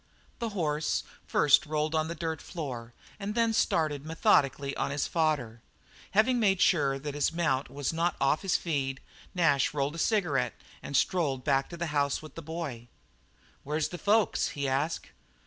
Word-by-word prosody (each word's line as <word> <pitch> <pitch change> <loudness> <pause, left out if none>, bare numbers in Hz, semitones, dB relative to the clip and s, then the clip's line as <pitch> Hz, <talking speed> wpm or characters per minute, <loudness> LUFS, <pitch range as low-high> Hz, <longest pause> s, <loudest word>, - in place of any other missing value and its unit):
The 235 -2 -2
horse 155 -2 0 0.2
first 145 +1 +4
rolled 155 +1 -1
on 155 0 +1
the 170 - -4
dirt 160 -1 -3
floor 125 -9 -6 0.3
and 205 +1 -4
then 230 -1 +2
started 150 -8 +1
methodically 140 -3 +2
on - - -1
his 140 0 -1
fodder. 145 -9 0 0.6
Having 245 +3 +4
made 195 -4 +3
sure 140 -7 +3
that 145 +1 -5
his 145 +1 +1
mount 160 -6 0
was 145 +2 -3
not 170 +2 0
"off 135 +3 +2
his 195 -2 +2
feed," 135 -5 -2 0.4
Nash 150 -5 +2
rolled 140 0 0
a 165 - -6
cigarette 175 -9 +1 0.3
and 140 - -1
strolled 145 -8 +1
back 135 -2 +1
to 170 - -8
the 170 - -2
house 140 -1 +1
with 155 -2 -11
the 165 - -7
boy. 150 -7 -5 0.8
"Where's 150 +1 -1
the 175 - -7
folks?" 210 -3 +2
he 140 -1 -1
asked. 140 +5 -1
155 Hz, 170 wpm, -29 LUFS, 140-170 Hz, 0.8 s, first